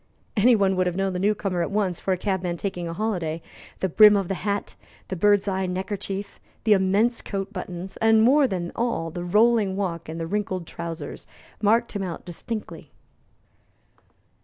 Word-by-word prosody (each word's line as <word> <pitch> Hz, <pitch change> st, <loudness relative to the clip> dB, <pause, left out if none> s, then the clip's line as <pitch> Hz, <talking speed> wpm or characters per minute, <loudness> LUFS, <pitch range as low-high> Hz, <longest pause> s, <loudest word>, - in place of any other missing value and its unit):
Any 235 Hz, +3 st, +5 dB
one 195 Hz, -2 st, +2 dB
would 185 Hz, 0 st, +2 dB
have 175 Hz, -, -2 dB
known 195 Hz, 0 st, 0 dB
the 180 Hz, -, -2 dB
new 205 Hz, +3 st, +2 dB
comer 190 Hz, -4 st, -2 dB
at 170 Hz, -, -1 dB
once 195 Hz, -4 st, 0 dB
for 195 Hz, -, -2 dB
a 185 Hz, -, +2 dB
cabman 180 Hz, -2 st, -2 dB
taking 180 Hz, -2 st, -3 dB
a 165 Hz, -, -4 dB
holiday. 175 Hz, -5 st, -2 dB, 0.4 s
The 190 Hz, -, +2 dB
brim 210 Hz, +4 st, +7 dB
of 195 Hz, -3 st, -2 dB
the -, -, +1 dB
hat, 200 Hz, 0 st, -2 dB, 0.4 s
the 190 Hz, -, -2 dB
bird's 205 Hz, +3 st, +3 dB
eye 190 Hz, -1 st, 0 dB
neckerchief, 195 Hz, +2 st, -4 dB, 0.2 s
the 220 Hz, -, +5 dB
immense 205 Hz, +5 st, +2 dB
coat 195 Hz, 0 st, -4 dB
buttons, 185 Hz, 0 st, -6 dB
and, 225 Hz, 0 st, +4 dB
more 275 Hz, +4 st, +5 dB
than 175 Hz, -5 st, -3 dB
all, 230 Hz, -9 st, -1 dB
the 175 Hz, +2 st, -5 dB
rolling 210 Hz, +1 st, +3 dB
walk 170 Hz, -5 st, -3 dB
and 160 Hz, +1 st, -5 dB
the 165 Hz, -, -2 dB
wrinkled 185 Hz, -1 st, -2 dB
trousers, 170 Hz, 0 st, -7 dB, 0.3 s
marked 225 Hz, +3 st, +3 dB
him 205 Hz, -, -3 dB
out 180 Hz, -3 st, -5 dB
distinctly. 210 Hz, +5 st, -6 dB
195 Hz, 185 wpm, -24 LUFS, 180-210 Hz, 0.4 s, brim